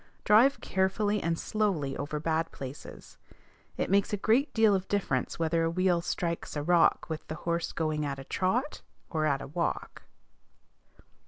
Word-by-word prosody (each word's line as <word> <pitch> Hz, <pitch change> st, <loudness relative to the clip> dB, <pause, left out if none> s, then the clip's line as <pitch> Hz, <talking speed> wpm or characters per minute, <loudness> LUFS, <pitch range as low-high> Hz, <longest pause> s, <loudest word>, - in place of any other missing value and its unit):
Drive 240 Hz, +7 st, +5 dB
carefully 205 Hz, +2 st, 0 dB
and 165 Hz, 0 st, 0 dB
slowly 175 Hz, -12 st, -1 dB
over 150 Hz, +1 st, -3 dB
bad 160 Hz, +1 st, -1 dB
places. 135 Hz, +1 st, -10 dB, 0.6 s
It -, -, 0 dB
makes 200 Hz, 0 st, +3 dB
a 205 Hz, -, 0 dB
great 230 Hz, +8 st, +2 dB
deal 220 Hz, -2 st, +4 dB
of 190 Hz, -1 st, -1 dB
difference 160 Hz, -11 st, -1 dB
whether 165 Hz, 0 st, +1 dB
a 165 Hz, -, +1 dB
wheel 180 Hz, 0 st, +2 dB
strikes 170 Hz, -1 st, -3 dB
a 145 Hz, -, -2 dB
rock 170 Hz, +1 st, +3 dB
with 160 Hz, -1 st, -6 dB
the 155 Hz, -, -5 dB
horse 170 Hz, 0 st, -1 dB
going 155 Hz, -2 st, -1 dB
at 140 Hz, -1 st, -3 dB
a 135 Hz, -, -7 dB
trot, 230 Hz, -, -1 dB, 0.3 s
or 155 Hz, -2 st, +1 dB
at 140 Hz, -2 st, 0 dB
a -, -, -7 dB
walk. 170 Hz, +4 st, -3 dB
170 Hz, 165 wpm, -29 LUFS, 155-200 Hz, 0.6 s, Drive